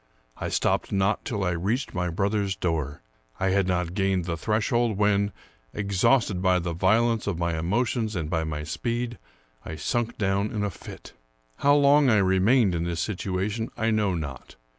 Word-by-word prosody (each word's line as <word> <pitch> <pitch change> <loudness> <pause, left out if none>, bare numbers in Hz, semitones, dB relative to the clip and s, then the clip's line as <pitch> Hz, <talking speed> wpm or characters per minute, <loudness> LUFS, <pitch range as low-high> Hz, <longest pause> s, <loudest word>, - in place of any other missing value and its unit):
I - - -3
stopped - - 0
not 100 +2 +1
till 105 -5 -2
I 90 - +1
reached 105 +10 -2
my 90 -2 -1
brother's 100 +2 0
door. 80 -7 -2 0.4
I 95 - +1
had 95 0 +2
not 90 -2 -1
gained 95 -3 0
the 85 -2 -2
threshold, 110 - 0
when, 100 -1 +2 0.4
exhausted 100 0 +2
by 95 -1 +3
the 85 -1 -2
violence 110 +6 +2
of 100 -5 -1
my 85 -1 -1
emotions 110 +6 -1
and 80 -4 -2
by 80 0 -1
my 75 -1 -4
speed, 115 +10 -3 0.4
I 80 - -6
sunk 115 +9 -2
down 100 0 0
in 105 -2 -3
a 100 - -1
fit. - - -11 0.4
How 145 0 +4
long 145 -1 +5
I 110 - +4
remained 95 +3 +3
in 85 -1 -1
this 85 -1 -3
situation 100 +4 -2
I 115 0 +1
know 105 -4 +1
not. 70 -5 -7
100 Hz, 175 wpm, -26 LUFS, 85-110 Hz, 0.4 s, long